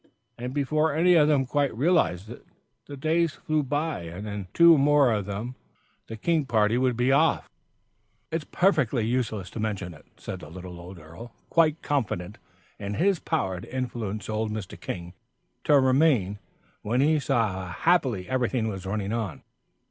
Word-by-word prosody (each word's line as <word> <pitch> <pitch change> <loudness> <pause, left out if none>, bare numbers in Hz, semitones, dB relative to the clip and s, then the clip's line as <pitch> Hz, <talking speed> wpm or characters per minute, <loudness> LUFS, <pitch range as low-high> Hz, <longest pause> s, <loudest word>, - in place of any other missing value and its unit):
And 125 +1 -5
before 150 +2 0
any 175 +3 +4
of 155 -3 +5
them 145 -3 +3
quite 140 -2 0
realised 120 - +1
it, - - -11 0.4
the 140 - -8
days 160 +2 +1
flew 155 -1 -1
by, 145 - -2
and 90 +6 -7
in 100 -2 -5
two 170 -1 +7
more 145 -2 +4
of 105 -2 -2
them 105 +5 -4 0.5
the 110 - -7
King 160 +6 +1
party 110 -1 +2
would 125 -1 +1
be 125 +2 +2
off. 155 +3 +3 0.8
"It's 160 -1 -2
perfectly 155 - +1
useless 110 -6 -2
to - - -7
mention 100 -5 -3
it," 75 - -17
said - - -7
the 75 - -11
little 90 +1 -9
old 90 +2 -10
earl, 85 +9 -12 0.2
quite 160 -2 +3
confident 105 -9 -2 0.4
in 100 0 -4
his 190 +1 +2
power 95 - -2
to - - -10
influence 115 -5 -4
old 110 0 -2
Mr. 105 -3 -6
King 85 -1 -6 0.5
to 145 -1 +5
remain 130 - +2 0.4
when 120 +4 -1
he 155 +3 +3
saw 120 -6 +1
how 95 0 -6
happily 120 - +1
everything 125 -2 0
was 95 -2 -6
running 100 +1 -2
on. 110 -8 -4
120 Hz, 170 wpm, -26 LUFS, 100-150 Hz, 0.8 s, two